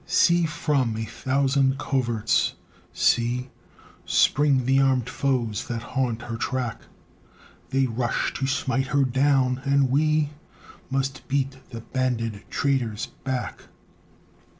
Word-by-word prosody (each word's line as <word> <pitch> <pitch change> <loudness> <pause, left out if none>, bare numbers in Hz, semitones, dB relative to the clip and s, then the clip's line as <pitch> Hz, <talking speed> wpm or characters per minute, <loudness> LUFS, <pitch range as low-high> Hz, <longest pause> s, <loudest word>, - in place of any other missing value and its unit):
See, 175 -1 +4
from 140 -7 0
a 110 - -3
thousand 135 +3 +1
coverts 120 -6 0 0.4
see, 125 +2 +1 0.5
Spring 140 -3 +3
the 135 +1 +3
armed 130 -3 +2
foes 120 -7 -1
that 115 -1 -4
haunt 125 -3 -1
her 115 -1 -5
track; 125 -1 -2 0.9
They 135 0 +2
rush 120 -1 -1
to 135 - -2
smite 135 0 0
her 140 +1 +2
down, 130 0 +2
and 140 -2 +2
we 155 +1 +2 0.6
Must 135 0 -2
beat 135 -1 -1
the 115 -2 -7
banded 115 -4 -2
traitors 125 -7 -1
back. 130 -2 -4
130 Hz, 115 wpm, -25 LUFS, 120-140 Hz, 0.9 s, See